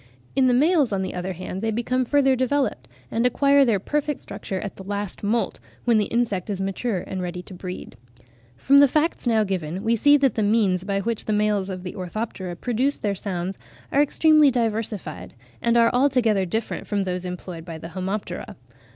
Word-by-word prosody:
In 265 Hz, -1 st, +4 dB
the 250 Hz, -, +4 dB
males, 295 Hz, -1 st, +3 dB
on 195 Hz, -1 st, 0 dB
the 190 Hz, -, -4 dB
other 180 Hz, +1 st, -3 dB
hand, 185 Hz, +2 st, -6 dB
they 225 Hz, -, 0 dB
become 245 Hz, +3 st, 0 dB
further 270 Hz, 0 st, +3 dB
developed, 260 Hz, +2 st, 0 dB, 0.2 s
and 230 Hz, -, 0 dB
acquire 280 Hz, +3 st, +4 dB
their 230 Hz, -6 st, +3 dB
perfect 295 Hz, +6 st, -2 dB
structure 195 Hz, -1 st, -5 dB
at 200 Hz, -, -6 dB
the 190 Hz, -, -10 dB
last 205 Hz, 0 st, -4 dB
moult, 225 Hz, +3 st, 0 dB, 0.3 s
when 235 Hz, -3 st, +4 dB
the 210 Hz, -, +1 dB
insect 225 Hz, -5 st, -1 dB
is 200 Hz, -2 st, -2 dB
mature 195 Hz, +1 st, -2 dB
and 190 Hz, -1 st, -4 dB
ready 180 Hz, 0 st, -4 dB
to 190 Hz, -, -10 dB
breed. 180 Hz, -7 st, -7 dB, 0.6 s
From 280 Hz, -, +5 dB
the 285 Hz, -, +8 dB
facts 305 Hz, 0 st, 0 dB
now 220 Hz, -2 st, +3 dB
given, 185 Hz, -2 st, -3 dB
we 230 Hz, +1 st, +2 dB
see 290 Hz, +6 st, +5 dB
that 270 Hz, -5 st, +2 dB
the 220 Hz, -, -1 dB
means 205 Hz, -4 st, +2 dB
by 195 Hz, 0 st, -1 dB
which 230 Hz, +1 st, -2 dB
the 215 Hz, -, 0 dB
males 210 Hz, -2 st, +1 dB
of 185 Hz, -1 st, -5 dB
the 180 Hz, -, -6 dB
Orthoptera 185 Hz, -1 st, -5 dB
produce 250 Hz, +8 st, 0 dB
their 205 Hz, -1 st, -1 dB
sounds 190 Hz, -1 st, -4 dB, 0.3 s
are 280 Hz, -, +4 dB
extremely 305 Hz, 0 st, +5 dB
diversified, 220 Hz, -, -3 dB, 0.3 s
and 235 Hz, 0 st, +2 dB
are 230 Hz, 0 st, +4 dB
altogether 245 Hz, -7 st, +2 dB
different 220 Hz, +6 st, -3 dB
from 205 Hz, -2 st, 0 dB
those 180 Hz, -1 st, -3 dB
employed 180 Hz, -2 st, -6 dB
by 165 Hz, -1 st, -7 dB
the 165 Hz, +1 st, -8 dB
Homoptera. 190 Hz, +4 st, -4 dB
210 Hz, 195 wpm, -24 LUFS, 185-250 Hz, 0.6 s, the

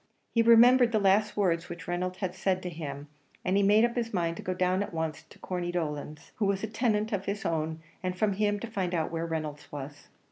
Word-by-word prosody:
He 230 Hz, -, +4 dB
remembered 235 Hz, +1 st, +7 dB
the 220 Hz, -, +2 dB
last 205 Hz, +2 st, +3 dB
words 180 Hz, -4 st, +1 dB
which 170 Hz, -1 st, -8 dB
Reynolds 180 Hz, +1 st, -2 dB
had 190 Hz, -3 st, -3 dB
said 185 Hz, -1 st, -1 dB
to 180 Hz, -, -4 dB
him, 145 Hz, -3 st, -6 dB, 0.4 s
and 185 Hz, -, +2 dB
he 200 Hz, -, +4 dB
made 210 Hz, +3 st, +5 dB
up 240 Hz, -, -2 dB
his 235 Hz, -2 st, -1 dB
mind 170 Hz, -3 st, 0 dB
to -, -, -6 dB
go 185 Hz, -, -3 dB
down 185 Hz, +1 st, +1 dB
at 200 Hz, -3 st, -4 dB
once 160 Hz, -2 st, -2 dB
to -, -, -16 dB
Corney 175 Hz, -1 st, -3 dB
Dolan's, 150 Hz, -3 st, -4 dB
who 215 Hz, -, +1 dB
was 195 Hz, 0 st, 0 dB
a -, -, 0 dB
tenant 220 Hz, -1 st, 0 dB
of 195 Hz, -1 st, -2 dB
his 200 Hz, 0 st, -3 dB
own, 160 Hz, -1 st, -2 dB, 0.2 s
and 185 Hz, -1 st, -3 dB
from 205 Hz, +1 st, +2 dB
him 205 Hz, +1 st, +1 dB
find 195 Hz, -5 st, -2 dB
out 160 Hz, -1 st, -1 dB
where 165 Hz, 0 st, -2 dB
Reynolds 155 Hz, -3 st, -5 dB
was. 145 Hz, 0 st, -8 dB
185 Hz, 235 wpm, -29 LUFS, 165-210 Hz, 0.4 s, remembered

